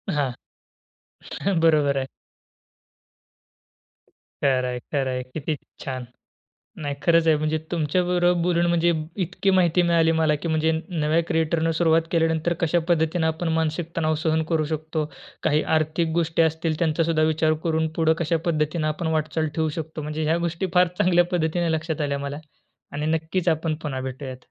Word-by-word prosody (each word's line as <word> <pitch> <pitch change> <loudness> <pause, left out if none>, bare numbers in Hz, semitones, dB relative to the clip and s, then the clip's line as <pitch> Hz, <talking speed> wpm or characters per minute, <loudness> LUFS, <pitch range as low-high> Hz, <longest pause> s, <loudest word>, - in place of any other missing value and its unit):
हां. 140 -3 0 1.3
बरोबर 150 -4 +3
आहे. 130 - -2 2.4
खरं 130 -2 +3
आहे, 125 0 -3
खरं 135 -2 +1
आहे. 125 0 -2
किती 155 0 -2 0.2
छान. 130 -2 -5 0.8
नाही, 145 -1 -3
खरंच 165 -1 +4
आहे, 160 - +5
म्हणजे 155 +1 0
तुमच्या 170 +2 +1
बरोबर 175 -1 +2
बोलून, 175 0 +2
म्हणजे 170 0 +3 0.3
इतकी 190 +3 -1
माहिती 180 -1 +3
मिळाली 165 -1 +3
मला, 155 -1 +3
की 150 - -5
म्हणजे 160 0 +2 0.2
नव्या 160 -1 +1
क्रिएटरने 160 0 +1
सुरुवात 165 0 +3
केल्यानंतर 165 0 +1
कशा 170 +1 +2
पद्धतीनं 160 0 +2
आपण 160 +2 -2
मानसिक 160 +1 -1
तणाव 155 -1 +1
सहन 160 0 +2
करू 160 -2 +2
शकतो. 155 0 -2 0.4
काही 155 0 +3 0.2
आर्थिक 155 +2 0
गोष्टी 165 -1 +1
असतील, 160 0 0
त्यांचा 165 -1 +1
सुद्धा 160 -1 +1
विचार 155 0 +2
करून 160 -1 +1
पुढं 160 -1 +3
कशा 165 0 +1
पद्धतीनं 155 -1 0
आपण 155 +2 -2
वाटचाल 155 +1 -1
ठेवू 160 -1 +1
शकतो. 155 0 -6
म्हणजे 155 +1 -3
ह्या 160 +2 +2
गोष्टी 170 +3 -2
फार 180 0 +5
चांगल्या 175 -1 +4
पद्धतीने 170 0 0
लक्षात 160 -1 -2
आल्या 140 -1 -1
मला. 140 +1 -5 0.5
आणि 150 +1 -3
नक्कीच 165 +3 -2
आपण 160 0 0
पुन्हा 135 -3 -3
भेटूयात. 130 0 -6
160 Hz, 155 wpm, -24 LUFS, 155-170 Hz, 2.4 s, आहे